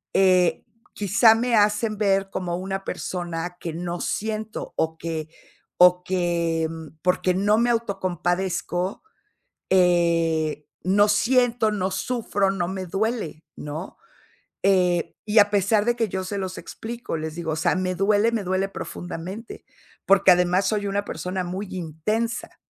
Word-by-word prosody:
eh, 185 -2 +4 0.3
quizá 220 +3 +5
me 240 +1 +1
hacen 210 +1 +2
ver 195 -2 +1
como 180 -3 -3
una 195 +1 -4
persona 175 -1 -4
que 165 - -5
no 175 +1 -4
siento 220 0 -3
o 160 0 0
que 160 -1 -4 0.5
o 180 0 +6
que, 170 -3 0
mm, 160 -1 -9
porque 180 +1 +1
no 205 +3 +2
me 235 +1 +2
autocompadezco, 185 -3 -1 0.7
eh, 165 -4 +2 0.2
no 200 +3 +4
siento, 240 +1 +3
no 190 -2 -1
sufro, 205 -1 -1
no 180 -3 -2
me 190 0 -4
duele, 195 -4 -2
¿no?, 150 +5 -7 0.7
eh, 180 -3 +2 0.2
y 210 - +1
a 205 0 +6
pesar 205 +1 +2
de 240 0 +2
que 225 -3 0
yo 190 0 -3
se 200 +2 -4
los 190 -1 -4
explico, 235 -4 -6
les 155 0 -5
digo, 165 -2 -3
o - - -1
sea, 160 - +1
me 185 0 -1
duele, 205 +4 +3
me 220 -3 -1
duele 190 +1 0
profundamente, 185 +4 -7 0.4
porque 195 -1 +6
además 180 +2 +3
soy 205 -2 0
una 200 +1 -1
persona 185 0 -3
muy 185 +3 -4
intensa. 190 +7 -3
190 Hz, 145 wpm, -24 LUFS, 175-210 Hz, 0.7 s, o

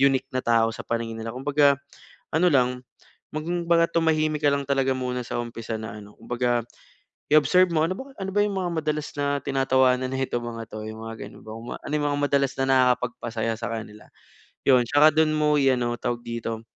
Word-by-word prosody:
unique 135 -1 +3
na 130 - 0
tao 115 -2 +2
sa - - -9
paningin 115 -1 -3
nila. 115 +2 -6
Kumbaga 140 +1 +3 0.5
ano 160 +3 +2
lang, 125 -5 +2 0.5
kumbaga 170 +1 +1
tumahimik 155 -2 +1
ka 145 - +5
lang 140 -1 -2
talaga 135 -1 +2
muna 125 -1 -3
sa 120 - -3
umpisa 115 -1 -5
na 110 -1 -7
ano 105 0 -12
kumbaga 120 -1 0 0.7
i-observe 175 +4 +5
mo, 160 -1 +2
"Ano 185 - -2
bang, 270 0 -9
ano 195 -1 -3
ba 205 - +4
yung 205 -1 -1
mga 180 -2 -1
madalas 150 -1 -2
na 145 -1 0
tinatawanan 130 -2 +2
nito 130 -2 -2
mga 115 -1 -6
'to?" 110 0 -6
Yung 110 0 -9
mga 115 - -6
gano'n - - -15
ba - - -8
kung 115 +2 -9
ano - - -8
yung 145 -1 +1
mga 145 - -1
madalas 140 -1 +1
na 135 - +2
nakakapagpasaya 120 -3 +1
sakanila? 110 -2 -6 0.6
Yun, 130 -3 +6
'tsaka 145 +3 +5
do'n 155 0 +3
mo 150 0 +3
i-ano 125 -4 +2
tawag 120 0 -2
dito? 115 -1 -4
130 Hz, 190 wpm, -25 LUFS, 120-150 Hz, 0.7 s, Yun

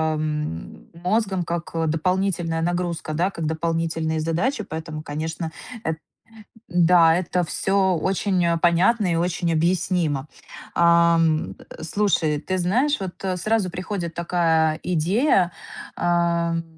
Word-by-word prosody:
ам, 150 - -4
мозгом 190 +1 0
как, 170 0 -4
а, 165 -1 0
дополнительная 175 0 0
нагрузка, 175 -2 -2
да, 175 +5 +1
как 165 - -5
дополнительные 160 0 -1
задачи. 180 - -1
Поэтому, 155 -1 -5
конечно, 160 +2 -4 0.3
э, 160 - +1 0.8
да, 175 -2 +5
это 180 0 0
всё 190 +2 +1
очень 190 +1 0 0.2
понятно 180 +3 +3
и - - +1
очень 170 0 0
объяснимо. 165 -3 0 0.5
Ам, 170 -2 +3 0.2
э, - - -10
слушай, 160 -5 +1
ты 185 0 -2
знаешь, 245 +12 +1
вот 190 0 -7
сразу 215 0 0
приходит 180 -1 -4
такая 165 -2 +1
идея, 180 - +2 0.4
ам. 170 -1 +1
170 Hz, 115 wpm, -23 LUFS, 160-185 Hz, 0.8 s, да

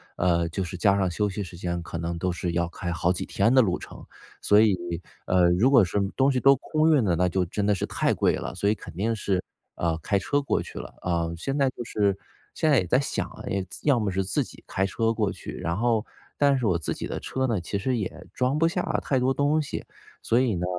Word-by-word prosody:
呃， 85 -1 +2
就 95 +3 -2
是 90 0 -6
加 100 +1 +3
上 95 -2 +1
休 105 +4 0
息 100 +1 -4
时 90 -1 -10
间 85 -1 -3
可 85 - -6
能 85 +1 -3
都 90 +2 -1
是 85 0 -3
要 85 0 +1
开 85 0 -5
好 85 +1 +1
几 90 - -4
天 115 +5 +2
的 130 - +7
路 95 -5 +1
程， - - -11 0.4
所 105 +1 +5
以， 105 -3 +4 0.5
呃， 90 -1 +4
如 100 +9 +4
果 130 -6 +6
是 95 +4 -1 0.2
东 135 +1 +3
西 130 - +1
都 135 +1 +6
空 155 +4 +1
运 130 - +3
了， 90 -4 +2
那 90 +2 +2
就 90 +1 0
真 100 +4 -2
的 105 - +3
是 - - -2
太 - - 0
贵 - - +2
了， - - -5
所 100 - +1
以 - - +4
肯 - - -11
定 110 +5 0
是， 95 -3 -1 0.3
呃， 85 -1 0
开 100 +5 +1
车 145 +9 0
过 140 - 0
去 - - -8
了， - - -9
呃， 85 -2 0
现 135 +10 -3
在 135 -2 +3
就 120 - -7
是 100 -4 0 0.4
现 160 - +1
在 135 - +6
也 90 - -2
在 125 - +3
想 140 - -2
啊， - - -11 0.3
自 - - -8
要 130 -5 +5
么 105 -3 -1
是 95 +1 0
自 95 +1 0
己 - - -14
开 95 - -1
车 115 +3 0
过 105 -3 0
去， - - -8
然 85 +2 -2
后 115 -2 +1 0.3
但 140 -1 +4
是 125 - -2
我 90 -4 +2
自 80 - -2
己 - - -5
的 - - -4
车 130 0 -2
呢， 115 -8 0
其 100 +4 -3
实 125 +6 0
也 90 -4 -5
装 130 +3 0
不 165 +2 +3
下 180 +1 -1 0.2
太 135 - +1
多 130 +1 +2
东 145 +3 +2
西。 145 - -5 0.4
所 120 +2 +3
以 120 -7 +1
呢， 90 +1 -2
100 Hz, 275 characters per minute, -26 LUFS, 90-125 Hz, 0.5 s, 的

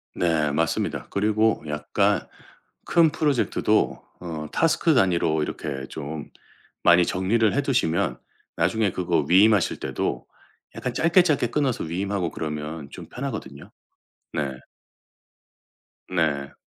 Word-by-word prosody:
네 80 -4 +1
맞습니다. 80 +1 -1
그리고 110 +2 +1
약간 75 0 0 0.6
큰 165 -3 +4
프로젝트도 145 -5 +1 0.2
어 80 -3 -6
태스크 165 -1 +2
단위로 85 -7 +2
이렇게 70 -2 -5
좀 75 0 -6 0.5
많이 85 0 +6
정리를 105 +5 +1
해 140 - +2
두시면 85 - 0 0.4
나중에 110 -3 +1
그거 85 -5 0
위임하실 100 +2 +4
때도 - - -3 0.5
약간 - - -3
짧게, 170 +3 +4
짧게 150 -8 +1
끊어서 135 0 -1
위임하고 95 +2 -2
그러면 75 -1 -5
좀 - - -10
편하거든요. 110 - -6 0.6
네. 70 -3 -1 1.6
네. 75 -6 0
90 Hz, 255 characters per minute, -24 LUFS, 75-110 Hz, 1.6 s, 많이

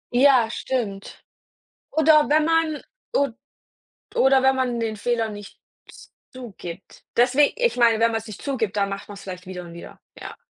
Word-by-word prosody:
Ja, 255 -3 +5
stimmt. 210 -8 -4 0.7
Oder 305 -1 +4
wenn 305 +1 +3
man 325 -2 +1 0.3
od 275 -5 0 0.8
oder 265 0 +4
wenn 265 0 +5
man 250 -2 -1
den 220 -2 -2
Fehler 230 0 -1
nicht 205 -1 -11 0.3
z - - -16 0.2
zugibt. 200 -8 -10
Deswe 250 +4 +4
ich 485 - +1
meine, 230 -2 +4
wenn 230 0 +2
man's 225 0 -4
nicht 210 - -9
zugibt, 225 -8 -2
dann 200 -1 +1
macht 195 0 -6
man's 205 -1 -10
vielleicht 180 -1 -8
wieder 180 -1 -6
und 170 - -11
wieder, 170 - -12 0.2
ja. - - -9
235 Hz, 165 wpm, -23 LUFS, 205-270 Hz, 0.8 s, Ja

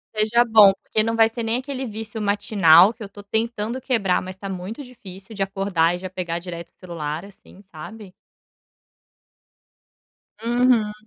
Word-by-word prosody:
seja 220 +3 +3
bom, 215 -4 +6
porque 215 - 0
não 225 +1 -1
vai 225 0 +4
ser 230 0 -6
nem 225 +1 0
aquele 265 0 -5
vício 220 0 -7
matinal, 200 -2 +5
que 225 - -11
eu 200 - -9
tô 205 +1 -12
tentando 220 +3 -3
quebrar 225 -8 0
mas 185 +1 -9
tá 195 0 -7
muito 190 +8 -6
difícil, 205 -5 -13
de 195 - 0
acordar 190 -4 0
e 175 - -7
já 185 - -7
pegar 175 -2 -4
direto 170 -1 -8
o - - -48
celular, 165 -2 -6
assim, 200 -1 -17
sabe? 195 +3 -12 2.3
Uhum. 235 -3 +2
205 Hz, 165 wpm, -22 LUFS, 185-225 Hz, 2.3 s, bom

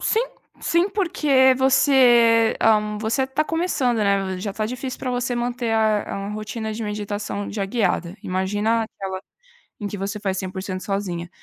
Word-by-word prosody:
Sim, 445 - +2 0.4
sim, 340 +3 +2
porque 300 -10 +3
você, 245 -4 +5
hã, 210 -1 +3
você 230 +5 0
tá 285 +4 0
começando, 310 -9 0
né, 195 -2 +1
já 200 +2 -4
tá 215 +2 -2
difícil 255 +2 -5
pra 255 - -3
você 245 0 -1
manter 240 -1 -2
a 215 -1 +2
a 195 0 -5
a - - -5
rotina 215 +1 -4
de 225 +1 -5
meditação 205 -1 -4
já 200 -2 -2
guiada, 195 -4 -1
imagina 205 +5 0
aquela 190 -3 -6 0.6
em 205 - -3
que 205 - -6
você 200 +2 -4
faz 190 -2 -2
100% 190 0 -4
sozinha. 180 -4 -3
215 Hz, 165 wpm, -22 LUFS, 200-250 Hz, 0.6 s, você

